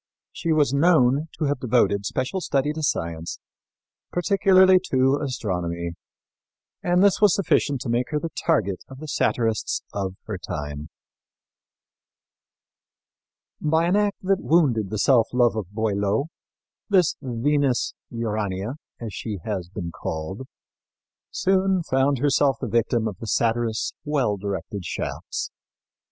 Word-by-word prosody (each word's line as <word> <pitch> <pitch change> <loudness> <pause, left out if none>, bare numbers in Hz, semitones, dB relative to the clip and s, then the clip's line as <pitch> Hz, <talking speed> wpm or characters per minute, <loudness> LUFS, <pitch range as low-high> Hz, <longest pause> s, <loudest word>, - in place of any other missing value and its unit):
She 165 - -2
was 150 -4 +3
known 145 -2 +4
to 155 - 0
have 145 -1 0
devoted 110 -5 +2
special 130 +9 -2
study 145 -2 0
to 160 - -5
science, 85 - -2 0.7
particularly 190 0 +5
to 135 +2 +3
astronomy, 90 -10 -3 0.9
and 180 +1 +3
this 200 0 +4
was 205 -4 +6
sufficient 145 - +1
to - - -4
make 120 +2 0
her 150 - 0
the 165 +2 -5
target 105 - 0
of 135 - -11
the 155 +3 -8
satirists 115 -6 0
of 95 -2 -3
her 105 -4 -5
time. 75 -1 -5 2.7
By 160 +2 +2
an 180 +3 +2
act 205 -1 +1
that 195 0 +1
wounded 130 - +2
the 110 - -3
self 120 +1 +4
love 120 -2 +3
of 105 -5 -4
Boileau 105 +5 0 0.6
this 185 -5 +3
Venus 135 +1 0 0.2
Urania, 110 0 -3 0.2
as 115 -4 -6
she 105 -3 -4
has 95 -5 -3
been 90 -3 -5
called, 90 +12 -5 0.8
soon 190 -1 +1
found 135 -1 +2
herself 140 -1 +2
the 130 - -3
victim 115 0 +1
of 105 - -6
the 115 - -7
satirist's 115 0 0
well 140 -8 +1
directed 100 0 -4
shafts. 85 - -4
125 Hz, 130 wpm, -24 LUFS, 105-155 Hz, 2.7 s, was